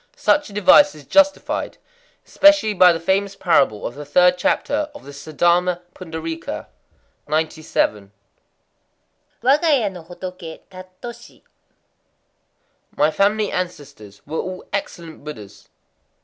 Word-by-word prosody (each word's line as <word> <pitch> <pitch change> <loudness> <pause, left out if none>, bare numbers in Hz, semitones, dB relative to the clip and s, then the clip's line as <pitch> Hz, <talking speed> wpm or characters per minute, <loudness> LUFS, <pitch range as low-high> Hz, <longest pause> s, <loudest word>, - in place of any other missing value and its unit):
Such 295 -4 +1
a - - -13
device 195 -1 +5
is 150 -2 -14
justified 290 - +1 0.5
especially 295 -8 +4
by 180 -2 +6
the 165 - -2
famous 195 +3 0
parable 135 - +1
of - - -4
the 145 +3 -8
third 180 +5 +4
chapter 290 +6 -1
of 290 - -11
the - - -10
Saddharma 175 +5 0
Pundarîka. 165 -2 -6 0.6
97.—Waga 155 - -2
ya 220 -5 -1
no 180 -2 -10
hotoké 175 -1 -9
tattoshi. 185 +6 -12 1.5
My 155 - +3
family 205 +4 +1
ancestors 145 - -6
were 155 +2 -4
all 185 0 -6
excellent 170 -6 -6
Buddhas. 110 -10 -11
180 Hz, 110 wpm, -20 LUFS, 155-200 Hz, 1.5 s, by